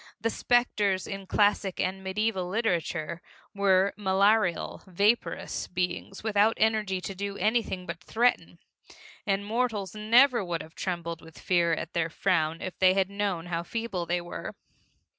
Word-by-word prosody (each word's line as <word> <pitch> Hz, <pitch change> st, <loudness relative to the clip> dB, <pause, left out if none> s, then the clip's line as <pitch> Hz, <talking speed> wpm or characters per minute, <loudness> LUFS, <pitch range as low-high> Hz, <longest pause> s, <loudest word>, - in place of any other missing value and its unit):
The 225 Hz, +2 st, 0 dB
specters 210 Hz, -7 st, +1 dB
in 195 Hz, -1 st, -6 dB
classic 205 Hz, -2 st, +2 dB
and 190 Hz, +1 st, -2 dB
medieval 190 Hz, -1 st, -1 dB
literature 170 Hz, -6 st, -1 dB, 0.3 s
were 200 Hz, -1 st, +3 dB
malarial, 200 Hz, -1 st, +2 dB
vaporous 205 Hz, +6 st, 0 dB
beings 180 Hz, +2 st, -3 dB
without 215 Hz, 0 st, +3 dB
energy 215 Hz, -4 st, +1 dB
to 195 Hz, -, -5 dB
do 200 Hz, +1 st, -4 dB
anything 215 Hz, -5 st, 0 dB
but 170 Hz, +1 st, -7 dB
threaten, 240 Hz, +5 st, +1 dB, 0.7 s
and 200 Hz, 0 st, 0 dB
mortals 220 Hz, -4 st, -1 dB
never 235 Hz, +3 st, +4 dB
would 170 Hz, -2 st, -3 dB
have 160 Hz, -, -15 dB
trembled 170 Hz, -3 st, -4 dB
with 160 Hz, -1 st, -15 dB
fear 170 Hz, -2 st, +2 dB
at -, -, -4 dB
their 165 Hz, -1 st, 0 dB
frown 165 Hz, -2 st, 0 dB
if 185 Hz, -, -6 dB
they 185 Hz, 0 st, +5 dB
had 195 Hz, 0 st, +1 dB
known 200 Hz, -4 st, -2 dB
how 170 Hz, -1 st, -2 dB
feeble 190 Hz, -2 st, -4 dB
they 175 Hz, 0 st, 0 dB
were. 175 Hz, 0 st, -7 dB
195 Hz, 145 wpm, -28 LUFS, 175-215 Hz, 0.7 s, they